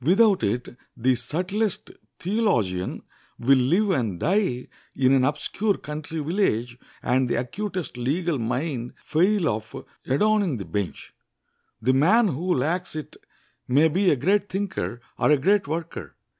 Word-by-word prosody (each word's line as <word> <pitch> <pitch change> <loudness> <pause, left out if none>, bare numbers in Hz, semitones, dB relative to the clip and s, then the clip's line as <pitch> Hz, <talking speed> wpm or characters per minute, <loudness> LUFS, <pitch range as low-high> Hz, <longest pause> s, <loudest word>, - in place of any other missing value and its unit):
Without 195 - +4
it 120 +4 -2 0.2
the 130 +2 +3
subtlest 180 - -2 0.3
theologian 120 - 0 0.3
will 135 +2 +4
live 180 +11 +2
and 115 - -1
die 175 -8 0 0.3
in 130 -1 +3
an 135 -1 +4
obscure 190 +9 0
country 155 +2 -6
village, 135 - 0 0.2
and 125 0 +2
the - - +1
acutest 180 - -4
legal 150 +5 -1
mind 125 +1 -2
fail 180 +3 +1
of 110 -3 -4 0.2
adorning 200 - +2
the 100 - -6
bench. 100 -4 -4 0.7
The 130 +3 +3
man 195 - +4
who 175 +5 0
lacks 165 +7 -1
it 155 - -6 0.5
may 145 +6 +4
be 185 +4 +2
a - - +4
great 195 +9 +1
thinker 190 -10 -3 0.2
or - - +3
a 150 - +6
great 190 +5 +2
worker. 165 +2 -5
150 Hz, 140 wpm, -25 LUFS, 125-190 Hz, 0.7 s, a